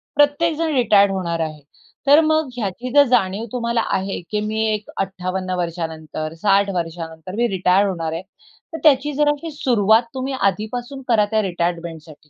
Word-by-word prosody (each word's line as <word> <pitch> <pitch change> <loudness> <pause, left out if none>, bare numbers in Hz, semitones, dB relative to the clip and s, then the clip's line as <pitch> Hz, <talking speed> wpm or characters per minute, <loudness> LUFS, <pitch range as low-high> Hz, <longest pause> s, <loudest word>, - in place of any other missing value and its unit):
प्रत्येक 290 +3 +3
जण 325 -1 0
रिटायर 205 -5 +5
होणार 175 -3 -2
आहे. 155 -2 -3 0.5
तर 290 +2 +8
मग 315 -2 +1
ह्याची 235 +2 -4
जर 285 0 +8
जाणीव 215 -3 +1
तुम्हाला 235 -1 0 0.2
आहे 195 +1 -3
की 210 - 0
मी 220 +1 -1
एक 210 0 -5
58 185 -1 -3
वर्षानंतर 160 -2 -4
60 200 0 +3
वर्षानंतर 165 +1 -5
मी 240 +2 +2
रिटायर 190 -1 +2
होणार 165 -4 -3
आहे, 165 - -3 0.5
तर - - -3
त्याची 295 -1 +4
जराशी 295 +3 0
सुरुवात 235 -7 +3
तुम्ही 265 +1 -3
आधीपासून 245 +4 -2
करा 225 -4 +4
त्या 220 0 +2
रिटायरमेंटसाठी. 170 -4 -4
205 Hz, 155 wpm, -20 LUFS, 175-255 Hz, 0.5 s, तर